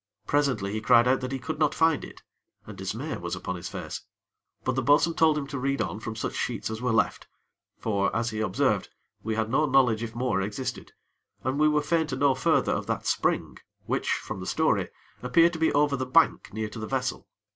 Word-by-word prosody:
Presently 135 Hz, -9 st, +1 dB
he 110 Hz, -, -2 dB
cried 120 Hz, +1 st, +5 dB
out 130 Hz, +1 st, +3 dB
that 130 Hz, 0 st, -4 dB
he 135 Hz, -, -1 dB
could 155 Hz, +4 st, -5 dB
not 150 Hz, -2 st, +2 dB
find 160 Hz, -3 st, +3 dB
it, -, -, -11 dB, 0.4 s
and 105 Hz, -, -9 dB
dismay 110 Hz, -, -4 dB
was 85 Hz, 0 st, -4 dB
upon 95 Hz, +1 st, -4 dB
his 90 Hz, +1 st, -6 dB
face. -, -, -6 dB, 0.6 s
But 130 Hz, -, 0 dB
the 130 Hz, -, 0 dB
bo'sun 145 Hz, +6 st, +4 dB
told 160 Hz, -2 st, +3 dB
him 145 Hz, -, -2 dB
to 140 Hz, -1 st, -5 dB
read 140 Hz, +2 st, -1 dB
on 100 Hz, +5 st, -2 dB
from 110 Hz, 0 st, -6 dB
such 110 Hz, -, -3 dB
sheets 110 Hz, -2 st, -3 dB
as 110 Hz, +1 st, -5 dB
were 125 Hz, -1 st, 0 dB
left; 115 Hz, -, +1 dB, 0.5 s
for, 100 Hz, -3 st, 0 dB
as 115 Hz, +1 st, 0 dB
he 110 Hz, -, -4 dB
observed, 105 Hz, -4 st, +1 dB, 0.3 s
we 110 Hz, 0 st, -2 dB
had 110 Hz, 0 st, -1 dB
no 150 Hz, +4 st, +3 dB
knowledge 130 Hz, -5 st, +3 dB
if 115 Hz, -1 st, -5 dB
more 125 Hz, -4 st, 0 dB
existed; 105 Hz, +7 st, -5 dB, 0.5 s
and 130 Hz, +3 st, -1 dB
we 155 Hz, -, +5 dB
were 150 Hz, -1 st, +2 dB
fain 160 Hz, 0 st, +1 dB
to 135 Hz, -, -3 dB
know 140 Hz, 0 st, +3 dB
further -, -, +2 dB
of -, -, -2 dB
that -, -, -2 dB
spring, -, -, 0 dB, 0.3 s
which, -, -, -1 dB
from -, -, -5 dB
the -, -, -6 dB
story, -, -, +1 dB, 0.3 s
appeared 165 Hz, +7 st, +4 dB
to 165 Hz, -, -5 dB
be 160 Hz, -, +3 dB
over 145 Hz, 0 st, +3 dB
the 130 Hz, -1 st, -3 dB
bank 160 Hz, +4 st, +3 dB
near 110 Hz, +1 st, -3 dB
to 115 Hz, -, -8 dB
the 110 Hz, -, -5 dB
vessel. 130 Hz, -1 st, -2 dB
130 Hz, 220 wpm, -27 LUFS, 110-145 Hz, 0.6 s, cried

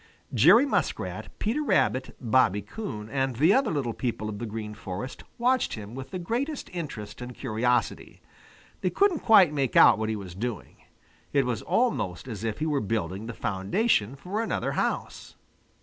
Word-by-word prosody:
Jerry 245 Hz, +5 st, +7 dB
Muskrat, 280 Hz, -, -2 dB
Peter 230 Hz, +8 st, -1 dB
Rabbit, 130 Hz, -, +1 dB
Bobby 110 Hz, -5 st, +2 dB
Coon, 105 Hz, -, -6 dB
and 135 Hz, +1 st, -1 dB
the 155 Hz, -, +5 dB
other 265 Hz, -2 st, +3 dB
little 135 Hz, -7 st, -1 dB
people 110 Hz, -3 st, -3 dB
of 105 Hz, -1 st, -6 dB
the 120 Hz, -, -4 dB
Green 105 Hz, 0 st, -5 dB
Forest 105 Hz, +6 st, -6 dB
watched 250 Hz, +1 st, +2 dB
him 105 Hz, 0 st, -9 dB
with 130 Hz, +1 st, -7 dB
the 185 Hz, -, -4 dB
greatest 245 Hz, -, -3 dB
interest 115 Hz, -12 st, -6 dB
and 125 Hz, 0 st, -7 dB
curiosity. 120 Hz, -1 st, -1 dB, 0.6 s
They 185 Hz, -, +1 dB
couldn't 385 Hz, -, +2 dB
quite 195 Hz, -9 st, +6 dB
make 135 Hz, -4 st, -1 dB
out -, -, +7 dB
what 110 Hz, 0 st, -1 dB
he 110 Hz, -, -1 dB
was 95 Hz, -4 st, -7 dB
doing. 110 Hz, +1 st, -5 dB, 0.6 s
It 140 Hz, -2 st, +3 dB
was 125 Hz, -3 st, -2 dB
almost 130 Hz, -, 0 dB
as 110 Hz, -4 st, -6 dB
if 110 Hz, -2 st, -2 dB
he 155 Hz, -, -2 dB
were 145 Hz, -3 st, 0 dB
building 100 Hz, -1 st, -3 dB
the 115 Hz, -, -6 dB
foundation 105 Hz, -, 0 dB
for 185 Hz, +10 st, -3 dB
another 230 Hz, -, -1 dB
house. -, -, -3 dB
125 Hz, 170 wpm, -27 LUFS, -, 0.6 s, Jerry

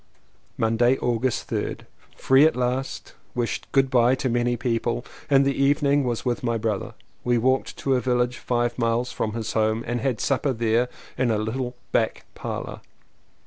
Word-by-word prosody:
Monday, 115 Hz, +3 st, +3 dB
August 120 Hz, 0 st, -1 dB
3rd. -, -, -2 dB, 0.4 s
Free 135 Hz, +2 st, +5 dB
at -, -, -1 dB
last! 125 Hz, +2 st, -2 dB, 0.2 s
Wished 120 Hz, -1 st, -3 dB
"Good 135 Hz, -1 st, +3 dB
bye" 125 Hz, 0 st, +4 dB
to 130 Hz, 0 st, -2 dB
many 120 Hz, 0 st, +1 dB
people. 120 Hz, 0 st, -1 dB, 0.2 s
In 140 Hz, -1 st, +5 dB
the 140 Hz, 0 st, +1 dB
evening 140 Hz, +1 st, +2 dB
was 120 Hz, 0 st, -2 dB
with 120 Hz, -1 st, 0 dB
my 115 Hz, -2 st, 0 dB
brother. 110 Hz, -3 st, -2 dB, 0.3 s
We 120 Hz, -1 st, +2 dB
walked 130 Hz, +3 st, +1 dB
to 135 Hz, -, 0 dB
a 125 Hz, -, +2 dB
village 125 Hz, -1 st, 0 dB
five 120 Hz, 0 st, -1 dB
miles 115 Hz, +1 st, +1 dB
from 110 Hz, -, -2 dB
his 115 Hz, -1 st, -3 dB
home 110 Hz, +1 st, +1 dB
and 120 Hz, 0 st, -2 dB
had 130 Hz, -4 st, 0 dB
supper 140 Hz, 0 st, +1 dB
there 115 Hz, +1 st, +1 dB, 0.3 s
in 130 Hz, -1 st, +2 dB
a 110 Hz, -, +2 dB
little 125 Hz, +4 st, -3 dB, 0.2 s
back 110 Hz, -, 0 dB
parlour. -, -, -5 dB
120 Hz, 170 wpm, -24 LUFS, 115-130 Hz, 0.4 s, Free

